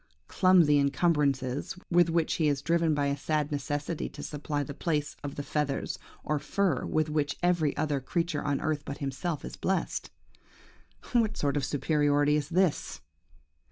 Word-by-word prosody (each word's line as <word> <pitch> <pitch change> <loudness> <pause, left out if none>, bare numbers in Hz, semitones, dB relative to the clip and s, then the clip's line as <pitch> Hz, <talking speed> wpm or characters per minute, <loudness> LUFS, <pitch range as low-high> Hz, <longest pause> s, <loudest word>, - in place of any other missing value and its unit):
Clumsy 175 -6 +5
incumbrances, 140 -2 +1 0.2
with 175 -1 +5
which 165 -1 +1
he 155 - +4
is 140 -2 0
driven 165 -2 +2
by 145 -1 +1
a 140 0 +1
sad 150 0 -1
necessity 145 +2 -2
to - - -9
supply 145 0 -3
the 140 - -6
place 150 -1 -1
of 140 -1 -5
the 145 - -4
feathers 145 -2 -2 0.2
or 150 -1 0
fur 185 -5 0
with 155 0 +1
which 150 -2 -1
every 170 -5 +2
other 150 -3 0
creature 165 +3 -1
on 140 -1 0
earth 155 -1 -1
but 140 - -6
himself 145 +3 -3
is - - -7
blessed. 190 -3 -1 1.0
What 225 -3 +2
sort 140 -1 0
of 145 - 0
superiority 145 +1 +2
is 150 -1 -1
this? 180 -3 0
150 Hz, 160 wpm, -29 LUFS, 145-165 Hz, 1.0 s, Clumsy